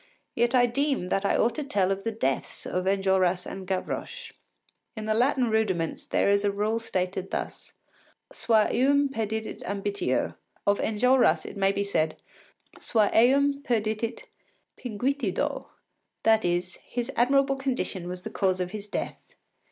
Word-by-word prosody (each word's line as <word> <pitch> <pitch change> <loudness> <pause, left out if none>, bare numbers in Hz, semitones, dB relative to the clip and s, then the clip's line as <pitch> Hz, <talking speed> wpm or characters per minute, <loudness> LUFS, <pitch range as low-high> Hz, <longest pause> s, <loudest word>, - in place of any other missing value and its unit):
Yet 240 +2 +2
I 245 -1 +6
deem 270 -5 0
that 195 +1 0
I - - +2
ought 230 - +2
to 300 - -3
tell 195 -8 +1
of 195 0 -2
the 225 - -1
deaths 135 -12 -2
of 180 0 -2
Enjolras 190 -2 +2
and 190 -1 -7
Gavroche. 455 - -4 0.7
In 215 - -4
the 215 - +1
Latin 245 +1 +2
Rudiments 190 -7 0
there - - +1
is 200 0 +3
a 205 - +2
rule 210 +3 0
stated 185 -3 -3
thus: - - -5 0.6
Sua 220 -2 +3
eum 280 +2 +3
perdidit 220 -3 -3
ambitio. 200 +1 -1 0.3
Of 200 0 +3
Enjolras 220 -7 +3
it - - -8
may 195 -1 +2
be 200 - -1
said: 160 -6 -1 0.6
Sua 215 -3 +2
eum 280 +4 +4
perdidit 220 -2 -1 0.5
pinguitudo, 255 +4 -2 0.6
that 220 0 +4
is, 175 +1 -1
his 245 +2 -5
admirable 275 +3 +3
condition 255 -9 -2
was 180 0 -6
the - - -6
cause 185 -2 +1
of 180 -1 -2
his 210 -1 -7
death. - - -5
215 Hz, 150 wpm, -27 LUFS, 190-245 Hz, 0.7 s, I